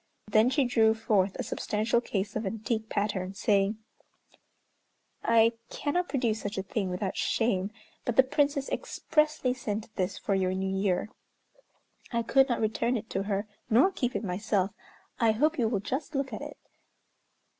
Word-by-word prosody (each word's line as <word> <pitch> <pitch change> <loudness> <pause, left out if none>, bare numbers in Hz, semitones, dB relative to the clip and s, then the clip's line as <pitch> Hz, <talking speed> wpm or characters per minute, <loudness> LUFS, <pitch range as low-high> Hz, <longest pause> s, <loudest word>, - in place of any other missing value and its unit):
Then 215 +3 +4
she 275 0 +2
drew 225 -2 +4
forth 205 -4 +1
a - - -3
substantial 220 +3 0
case 200 -3 -3
of 220 - -1
antique 220 +2 -2
pattern, 195 -2 -1
saying, 200 +1 +2 1.5
"I 230 0 +5 0.2
cannot 355 +5 -1
produce 235 -6 0
such 205 0 -4
a 190 - -1
thing 195 -1 -2
without 185 +1 -2
shame, 200 -4 +1 0.3
but 240 - -1
the 265 - +7
Princess 280 +1 +1
expressly 305 - 0
sent 220 -4 -5
this 185 -2 -1
for 200 - -1
your 185 -1 +1
New 190 0 -1
Year. 190 +1 0 1.0
I 235 -1 0
could 270 +4 +4
not 240 - 0
return 230 +3 +1
it 220 0 -8
to 195 - 0
her 200 +1 -1 0.2
nor 255 - +5
keep 250 -9 -2
it - - -1
myself; 195 0 0 0.5
I 225 -3 +4
hope 305 +7 +1
you 230 - +3
will 220 -3 0
just 285 +7 -4
look 275 -1 -1
at - - -5
it." - - -7
220 Hz, 165 wpm, -29 LUFS, 200-250 Hz, 1.5 s, the